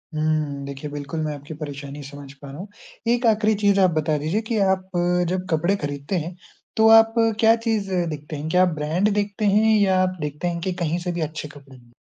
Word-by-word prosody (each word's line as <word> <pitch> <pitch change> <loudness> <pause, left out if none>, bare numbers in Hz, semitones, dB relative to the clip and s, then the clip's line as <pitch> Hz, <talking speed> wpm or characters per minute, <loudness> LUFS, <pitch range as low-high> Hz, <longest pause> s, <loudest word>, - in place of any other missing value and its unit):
हुँ, 155 -2 -1
देखिए 140 +1 -7
बिल्कुल 145 +3 -5
मैं 150 - -2
आपकी 145 +2 -9
परेशानी 145 -1 -7
समझ 140 0 -10
पा 140 - -9
रहा 135 - -9
हूँ। 190 - -7 0.4
एक 240 +1 +2
आख़िरी 220 -1 +3
चीज़ 200 -1 +3
आप 185 -1 +5
बता 155 0 +1
दीजिए 160 +9 -1
कि 230 - 0
आप 190 0 -2 0.4
जब 185 0 -2
कपड़े 170 +5 +1
खरीदते 145 +5 -3
हैं, 175 +1 -7 0.4
तो 220 0 +5
आप 225 0 +4 0.3
क्या 225 0 +6
चीज़ 210 -3 0 0.2
देखते 150 0 -6
हैं? 150 +2 -5
क्या 180 +3 +4
आप 175 -3 +1
ब्रांड 160 +7 0
देखते 205 0 -1
हैं 215 +2 +4
या 190 -2 +3
आप 185 0 0
देखते 150 +3 -3
हैं 170 -1 -2
कि 185 +2 -2
कहीं 165 +1 0
से - - +1
भी 170 -1 -4
अच्छे 155 0 -4
कपड़े 140 -2 -15
मिले? 120 -1 -21
165 Hz, 220 wpm, -23 LUFS, 145-200 Hz, 0.4 s, क्या